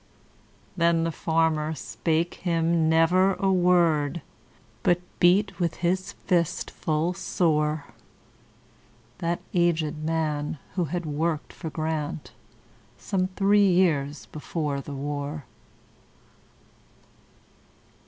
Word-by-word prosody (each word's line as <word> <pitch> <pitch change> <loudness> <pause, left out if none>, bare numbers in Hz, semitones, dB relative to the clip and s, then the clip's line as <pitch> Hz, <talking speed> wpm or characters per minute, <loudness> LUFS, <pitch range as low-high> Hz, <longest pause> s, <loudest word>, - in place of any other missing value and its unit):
Then 170 -2 +3
the 165 - 0
farmer 160 -1 0
spake 165 +3 -1
him 165 -2 +1
never 180 +4 +4
a 195 -1 +1
word, 170 -4 +2 0.6
But 175 0 +3 0.2
beat 190 +2 +3
with 170 -2 0
his 185 +2 -1
fist 170 -4 -1
full 160 +3 -1
soreThat 155 -4 0 1.7
aged 165 -3 +1
man, 155 -2 -1 0.2
who 180 -3 0
had 175 +3 -3
worked 155 +1 -2
for 165 - -6
GrantSome 160 +4 -5
three 200 0 +4
years 155 -6 +1
before 150 -2 -3
the 140 0 -7
war. 145 +1 -4
165 Hz, 90 wpm, -26 LUFS, 150-175 Hz, 1.7 s, never